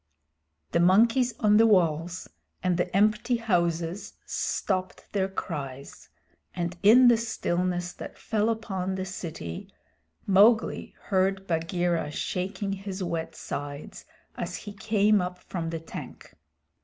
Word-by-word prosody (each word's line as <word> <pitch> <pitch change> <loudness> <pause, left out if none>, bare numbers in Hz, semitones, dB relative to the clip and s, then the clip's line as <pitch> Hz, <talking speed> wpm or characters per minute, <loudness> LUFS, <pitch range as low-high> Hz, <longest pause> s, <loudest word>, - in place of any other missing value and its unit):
The - - +2
monkeys 230 +7 +4
on 210 -1 +5
the 225 +1 +6
walls 175 -3 +1 0.4
and 180 -1 +2
the 180 +2 0
empty 215 +4 +2
houses 175 -4 -1
stopped 185 -2 -2
their 195 -2 +1
cries, 140 -7 -6 0.5
and 175 0 -2
in 240 +5 +7
the 240 -1 +6
stillness 180 -5 -1
that - - -9
fell 220 -1 0
upon 190 -5 -2
the 190 0 -3
city 160 - -6 0.5
Mowgli 210 +4 +3
heard 195 0 +1
Bagheera 170 -1 0
shaking 190 +5 -3
his 195 -1 -5
wet 170 -2 -3
sides 145 +1 -6 0.3
as - - -4
he 205 - -7
came 210 -1 +2
up 180 0 -4
from 170 -2 -5
the 165 0 -3
tank. 160 - -10
185 Hz, 125 wpm, -27 LUFS, 170-210 Hz, 0.5 s, in